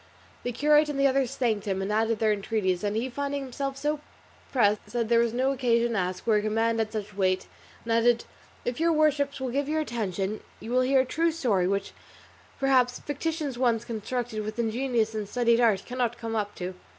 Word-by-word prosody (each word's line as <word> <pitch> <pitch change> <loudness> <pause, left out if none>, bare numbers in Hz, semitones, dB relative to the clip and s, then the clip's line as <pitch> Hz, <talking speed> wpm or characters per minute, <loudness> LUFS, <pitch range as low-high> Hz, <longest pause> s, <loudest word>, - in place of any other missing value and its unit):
The 245 - -2
curate 295 +4 +4
and 285 -2 -3
the 275 - +4
others 270 -2 +2
thanked 220 -5 0
him 190 -1 0
and 195 +2 -2
added 225 +1 +2
their 215 0 +2
entreaties, 195 -3 -1
and 205 0 -1
he 230 +4 0
finding 280 +2 -3
himself 270 +1 -4
so 295 +2 -1 0.5
pressed 210 -5 +2
said 235 -2 -1
there 235 -1 +5
was 235 -1 +2
no 260 +3 +1
occasion 240 -3 +2
to - - 0
ask, 180 0 -3
where 215 -2 +4
a - - -2
command 225 +2 +1
had 220 -1 -1
such 210 -2 -5
weight, 185 -1 +1 0.4
and 230 - -1
added, 235 +1 +3 0.4
"If 245 +2 -2
your 335 +1 +3
worships 290 -3 +2
will 260 -1 -2
give 280 +2 -1
me 300 - -1
your 315 - +1
attention 210 - -2 0.2
you 225 - -7
will 255 +1 +3
hear 265 +1 +4
a - - -2
true 330 +6 +1
story 220 - +1
which, 200 +1 -1 0.7
perhaps, 255 -2 +3
fictitious 290 -2 -3
ones 235 -3 +2
constructed 230 0 -3
with 215 0 -5
ingenious 235 -1 0
and 210 -2 -4
studied 235 0 +3
art 215 -5 +3
cannot 245 -1 -2
come 225 -1 -4
up 205 -2 -2
to." 180 +1 -5
235 Hz, 210 wpm, -27 LUFS, 215-270 Hz, 0.7 s, there